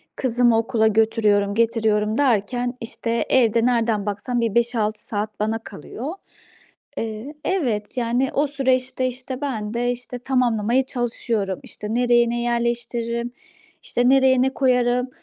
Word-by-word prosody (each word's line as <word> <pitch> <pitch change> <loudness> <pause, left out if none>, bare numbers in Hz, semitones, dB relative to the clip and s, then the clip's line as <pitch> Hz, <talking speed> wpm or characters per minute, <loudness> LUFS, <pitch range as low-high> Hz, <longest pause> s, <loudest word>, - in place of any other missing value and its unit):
kızımı 240 -2 +2
okula 225 -1 +2
götürüyorum, 210 -2 +2
getiriyorum 220 -2 +1
derken, 245 -1 +1
işte, 230 0 -2
evde 235 -2 +3
nereden 230 -4 +1
baksam 220 +4 -2
bir 230 -2 -1
5-6 230 -3 0
saat 210 0 -4
bana 220 +1 0
kalıyor. 250 - -7 0.8
Eee 225 +6 -5
Evet, 240 - -1
yani, 245 +2 +1
o 290 +2 +2
süreçte, 260 -2 0
işte, 255 +1 -6
ben 220 -7 -3
de, 245 +1 0
işte, 245 0 -7
tamamlamaya 245 -1 +1
çalışıyorum. 230 -6 -2
İşte, 210 +1 -7
nereye 240 -1 +3
ne 240 0 -1
yerleştiririm, 235 0 -1 0.5
işte, 245 +1 +1
nereye 265 -1 +5
ne 265 - +3
koyarım. 250 -1 +2
235 Hz, 130 wpm, -22 LUFS, 220-250 Hz, 0.8 s, nereye